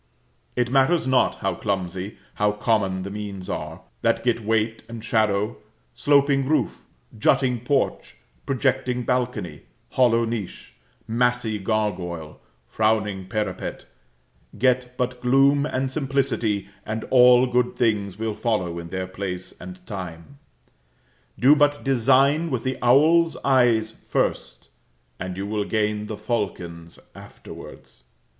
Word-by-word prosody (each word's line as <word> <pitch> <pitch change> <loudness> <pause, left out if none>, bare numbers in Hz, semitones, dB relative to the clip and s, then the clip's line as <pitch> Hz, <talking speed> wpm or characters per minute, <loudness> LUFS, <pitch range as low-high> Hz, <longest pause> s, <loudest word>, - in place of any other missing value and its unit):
It 120 0 0
matters 135 +5 +3
not 130 -1 +2
how 95 -2 0
clumsy, 95 -1 -3 0.2
how 105 0 +1
common, 100 -4 0
the 100 - -6
means 100 -3 -6
are, - - -5 0.2
that - - +1
get 120 -1 +1
weight 110 +1 0
and 115 -1 -7
shadow 110 -2 +1 0.4
sloping 140 - +3
roof, 155 - 0 0.3
jutting 125 +3 +2
porch, 135 +4 -1 0.3
projecting 130 -2 0
balcony, 120 - -2 0.3
hollow 115 -2 +3
niche, 115 -5 -6 0.3
massy 120 -2 0
gargoyle, 95 -7 -2 0.3
frowning 105 - 0
parapet; 105 +1 -3 0.7
get 125 0 +1
but 125 0 -2
gloom 140 +3 +4
and 130 -2 -2
simplicity, 130 -8 -1 0.2
and 110 +1 -4
all 125 0 +7
good 125 0 0
things 105 -5 0
will 110 0 -2
follow 100 -7 -1
in 85 0 -8
their 95 +1 -3
place 95 -1 -6
and 185 0 -10
time; 95 +5 -8 1.0
do 135 +4 +6
but 145 -1 +2
design 135 +5 +3
with 130 -5 -2
the 130 0 -2
owl's 155 +7 +4
eyes 120 -5 +3
first, - - -3 0.5
and 95 0 -5
you 100 - -3
will 105 0 -1
gain 105 0 -1
the 110 - -5
falcon's 90 -7 -4 0.2
afterwards. - - -12
115 Hz, 125 wpm, -23 LUFS, 100-130 Hz, 1.0 s, all